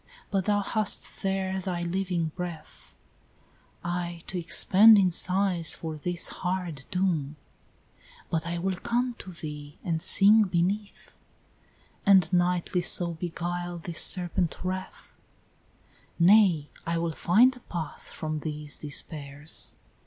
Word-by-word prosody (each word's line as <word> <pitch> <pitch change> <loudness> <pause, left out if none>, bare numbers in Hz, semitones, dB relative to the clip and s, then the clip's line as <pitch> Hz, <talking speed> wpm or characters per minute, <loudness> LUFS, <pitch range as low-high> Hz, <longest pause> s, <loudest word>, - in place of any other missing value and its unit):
but 195 -3 0
thou 205 -1 +2
hast 215 +1 0
there 190 -1 -1
thy 175 -2 -3
living 175 -2 -1
breath 175 -4 -8 0.4
" - - -34 0.2
"Aye 175 0 -3
to - - -7
expend 205 +5 +6
in 190 -2 +3
sighs 180 -1 +2
for 160 -1 -6
this 175 +3 +1
hard 180 -7 -3
doom; 170 -6 -1 0.4
" - - -27
"But 165 0 -1
I 170 0 -3
will 185 +1 -2
come 240 +4 -1
to 185 - -9
thee 150 -3 -8
and 165 -2 -2
sing 210 +5 +6
beneath," 195 +3 -3 0.8
"And 190 -3 +4
nightly 180 0 +1
so 175 0 +1
beguile 175 +1 -4
this 170 0 -4
serpent 175 -2 +1
wreath; 185 0 -6 0.5
" - - -35 0.3
"Nay, 175 -5 +4
I 170 0 -2
will 165 0 -1
find 240 +12 +4
a - - -13
path 165 - -7
from 155 -1 -4
these 150 -1 -5
despairs." 145 0 -5
175 Hz, 130 wpm, -27 LUFS, 165-190 Hz, 0.8 s, expend